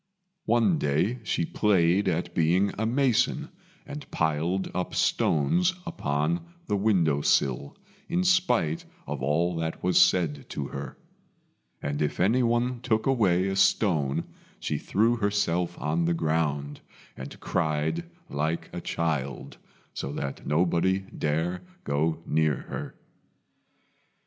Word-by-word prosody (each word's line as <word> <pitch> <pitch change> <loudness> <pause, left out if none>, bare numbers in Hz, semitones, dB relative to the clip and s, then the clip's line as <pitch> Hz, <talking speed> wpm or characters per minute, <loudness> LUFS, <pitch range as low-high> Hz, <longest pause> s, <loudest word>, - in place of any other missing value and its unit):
One 120 +9 +3
day 90 - +1
she 85 - 0
played 95 0 +2
at 85 0 -1
being 90 +5 +2
a 110 +1 -1
mason, 135 +4 +1 0.4
and 145 0 -8
piled 80 +4 0
up 90 0 -3
stones 175 - +2
upon 85 - -1 0.2
the 105 - 0
window 90 -8 +2
sill, 70 0 +1 0.3
in 175 +2 +1
spite 165 - +2 0.2
of - - -5
all 80 +6 +1
that 80 0 -3
was 90 0 +5
said 75 -6 +2
to 70 -2 -4
her; - - -7 0.9
and 70 +1 -2
if 75 - -1
anyone 120 +4 +2
took 110 -3 0
away 100 -9 +3
a 95 - -1
stone, 80 -9 +2 0.4
she - - -2
threw 115 +4 +2
herself 100 -5 0
on 80 +5 0
the 85 0 +1
ground, 75 -3 -1 0.3
and 65 +2 -9
cried 80 -1 -1 0.2
like 75 +3 -2
a - - -4
child, 75 -5 -3 0.4
so 70 - -4
that 70 -2 -5
nobody 90 +4 +2
dared 80 +4 -1 0.2
go 80 +3 0
near 80 -1 +2
her. - - -7
85 Hz, 125 wpm, -27 LUFS, 75-105 Hz, 0.9 s, was